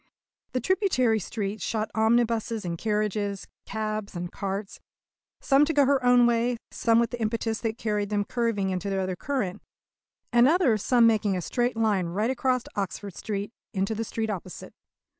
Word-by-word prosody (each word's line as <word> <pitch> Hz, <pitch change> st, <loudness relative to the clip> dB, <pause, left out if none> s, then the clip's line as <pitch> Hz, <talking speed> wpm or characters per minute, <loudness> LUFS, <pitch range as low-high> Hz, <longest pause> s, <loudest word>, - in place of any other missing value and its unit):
The 255 Hz, -, +1 dB
tributary 255 Hz, -, +2 dB
streets 205 Hz, 0 st, -4 dB
shot 220 Hz, -1 st, -2 dB
omnibuses 225 Hz, -1 st, +1 dB
and 170 Hz, -1 st, -2 dB
carriages, 210 Hz, 0 st, -1 dB, 0.2 s
cabs 215 Hz, -2 st, -3 dB
and 175 Hz, 0 st, -4 dB
carts 195 Hz, 0 st, -4 dB, 0.6 s
some 275 Hz, +1 st, +4 dB
to 320 Hz, -, -1 dB
go 285 Hz, -2 st, +5 dB
her 270 Hz, -1 st, +2 dB
own 245 Hz, -1 st, +6 dB
way, 240 Hz, +1 st, +2 dB
some 230 Hz, -2 st, +3 dB
with 235 Hz, +1 st, 0 dB
an 245 Hz, -, -4 dB
impetus 225 Hz, 0 st, -1 dB
that 225 Hz, -1 st, -2 dB
carried 210 Hz, -3 st, -1 dB
them 205 Hz, -1 st, 0 dB
curving 225 Hz, -5 st, -1 dB
into 185 Hz, +2 st, -2 dB
the 195 Hz, -1 st, 0 dB
other 185 Hz, -1 st, -2 dB
current, 210 Hz, -4 st, -3 dB, 0.7 s
and 240 Hz, +1 st, +6 dB
other 310 Hz, -7 st, +4 dB
some 240 Hz, +3 st, +4 dB
making 210 Hz, -4 st, +3 dB
a -, -, -2 dB
straight 245 Hz, +3 st, -1 dB
line 210 Hz, -6 st, +1 dB
right 210 Hz, +8 st, 0 dB
across 255 Hz, -1 st, 0 dB
Oxford 200 Hz, -1 st, -4 dB
Street 205 Hz, 0 st, -4 dB, 0.2 s
into 195 Hz, +3 st, 0 dB
the 220 Hz, +1 st, -2 dB
street 220 Hz, 0 st, -3 dB
opposite. 185 Hz, -3 st, -7 dB
220 Hz, 170 wpm, -26 LUFS, 200-240 Hz, 0.7 s, own